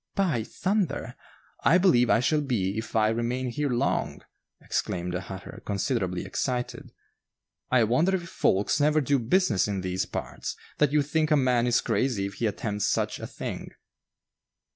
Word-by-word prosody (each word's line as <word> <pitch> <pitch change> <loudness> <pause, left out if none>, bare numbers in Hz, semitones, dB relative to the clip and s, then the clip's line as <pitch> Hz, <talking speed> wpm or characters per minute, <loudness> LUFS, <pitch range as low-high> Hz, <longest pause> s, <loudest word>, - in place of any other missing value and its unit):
"By 170 - +1
thunder! 190 - -1 0.5
I 175 - +6
believe 170 -11 +4
I 115 - +4
shall 150 +4 +2
be 105 -9 -1
if 110 +1 -5
I 110 -1 +4
remain 120 +3 -1
here 145 +4 -1
long," 125 +3 -1 0.4
exclaimed 90 0 -2
the 90 - -2
hatter, 95 +1 -9
considerably 100 -3 -1
excited. 125 -2 -3 0.8
"I 130 -2 +4
wonder 155 - +2
if 175 -2 -4
folks 100 - +1
never 150 +1 +4
do 140 -1 +2
business 120 - +2
in 100 -2 -2
these 95 0 -2
parts, - - -5 0.2
that 150 -1 +4
you 150 -1 +3
think 155 +2 0
a 150 - +4
man 125 -3 +2
is 120 0 +3
crazy 120 -7 0
if 100 - -5
he 115 - -1
attempts 105 -1 -2
such - - 0
a - - -6
thing?" - - -6
125 Hz, 165 wpm, -27 LUFS, 105-150 Hz, 0.8 s, I